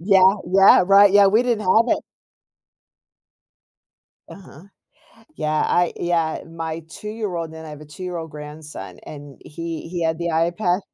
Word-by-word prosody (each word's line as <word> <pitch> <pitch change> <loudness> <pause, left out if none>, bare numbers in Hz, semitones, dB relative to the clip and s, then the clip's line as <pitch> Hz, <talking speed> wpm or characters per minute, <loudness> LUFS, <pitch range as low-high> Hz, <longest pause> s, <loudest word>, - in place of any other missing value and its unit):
yeah 190 +1 +5 0.2
yeah, 195 0 +6
right, 200 0 +6
yeah, 205 -1 +6
we 215 +5 +3
didn't 240 -4 -1
have 215 +4 +3
it. - - -8 2.3
Uh-huh, 180 -4 -14 0.7
yeah, 155 0 -1
I 175 -1 +1
yeah, 165 -2 -1
my 165 0 -6
two-year-old, 200 -4 -5
and 160 0 -10
I 155 - -9
have 150 - -10
a 150 - -11
two-year-old 170 +1 -7
grandson, 150 +1 -10
and 145 -2 -11
he 165 +1 -7
he 175 -1 -4
had 160 0 -1
the 170 0 -3
iPad. 175 +3 0
170 Hz, 145 wpm, -21 LUFS, 160-195 Hz, 2.3 s, yeah